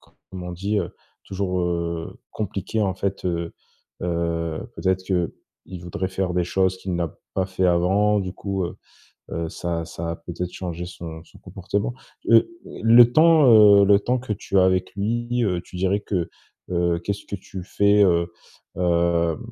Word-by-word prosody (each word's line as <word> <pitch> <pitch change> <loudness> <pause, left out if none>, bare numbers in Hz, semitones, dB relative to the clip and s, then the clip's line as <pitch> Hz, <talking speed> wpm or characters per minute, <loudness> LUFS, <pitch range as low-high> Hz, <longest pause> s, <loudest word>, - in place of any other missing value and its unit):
comme 95 -1 -12
on 90 - -5
dit, 100 +4 -1
heu, 90 -3 -4 0.3
toujours, 95 -2 -2
heu, 85 -1 -3
compliqué, 105 +1 -3
en 95 -2 0
fait, 95 +1 -3
heu 85 -2 -2 0.5
heu, 85 -2 -2
peut-être 95 0 0
qu'il 90 0 -4
voudrait 90 +1 -3
faire 95 -1 -2
des 90 -1 +1
choses 95 +2 +1
qu'il 95 -1 -4
n'a 85 -2 -2 0.2
pas 95 - 0
fait 95 -1 0
avant. 95 +4 +3
Du 95 -2 -4
coup, 95 -1 -3
heu 85 - -6 0.5
heu, 85 0 -3
ça 85 0 -3
ça 85 0 -5
a 85 - -4
peut-être 85 +1 -6
changé 90 -2 -5
son 80 -3 -8
son - - -18
comportement. 100 +5 -3 0.4
Heu, 115 - +7 0.2
le 115 +1 +5
temps, 160 -1 +6 0.3
heu, - - +6
le 100 0 +6
temps 125 +4 0
que 120 -3 -4
tu 100 -1 -1
as 95 - +6
avec 95 0 +1
lui, 120 +4 -1
heu, 90 -4 0
tu 90 - -12
dirais 95 +3 +1
que, 90 -5 -2 0.4
heu, 85 -1 +1
qu'est-ce 100 +3 -4
que 100 - -4
tu 95 0 -9
fais, 100 +2 +3
heu 85 -2 +2 0.5
heu, 85 -2 +2
90 Hz, 170 wpm, -23 LUFS, 85-100 Hz, 0.5 s, Heu